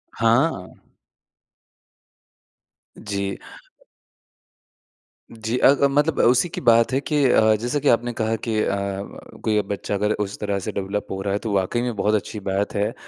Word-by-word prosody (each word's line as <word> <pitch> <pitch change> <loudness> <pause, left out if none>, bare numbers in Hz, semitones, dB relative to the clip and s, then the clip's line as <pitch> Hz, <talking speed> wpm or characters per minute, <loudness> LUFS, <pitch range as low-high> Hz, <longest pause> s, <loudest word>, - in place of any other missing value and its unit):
हाँ। 115 - +1 2.2
जी। 100 -2 -4 1.9
जी 115 +2 -3
अ - - +5
अ, - - +7
मतलब 145 +2 +1
उसी 125 +8 +4
की - - -6
बात 115 +2 +5
है 135 - +2
कि 150 -2 0
अ, 110 -2 +4
जैसा 125 +5 -1
कि 145 - -2
आपने 120 +1 +2
कहा 110 +1 +1
कि 110 -1 0
अ, - - 0 0.7
कोई 105 -1 +2
बच्चा 100 0 -4
अगर 105 +1 0
उस 100 - -8
तरह 100 -1 -2
से - - -1
डेवलप 100 +1 -3
हो 95 - -4
रहा 100 0 -2
है, 100 - 0
तो 110 - -4
वाक़ई 95 +5 0
में 120 -2 -2
बहुत 105 +2 +1
अच्छी 105 +1 -3
बात 100 +1 -1
है। 105 +3 0
110 Hz, 160 wpm, -22 LUFS, 100-120 Hz, 2.2 s, अ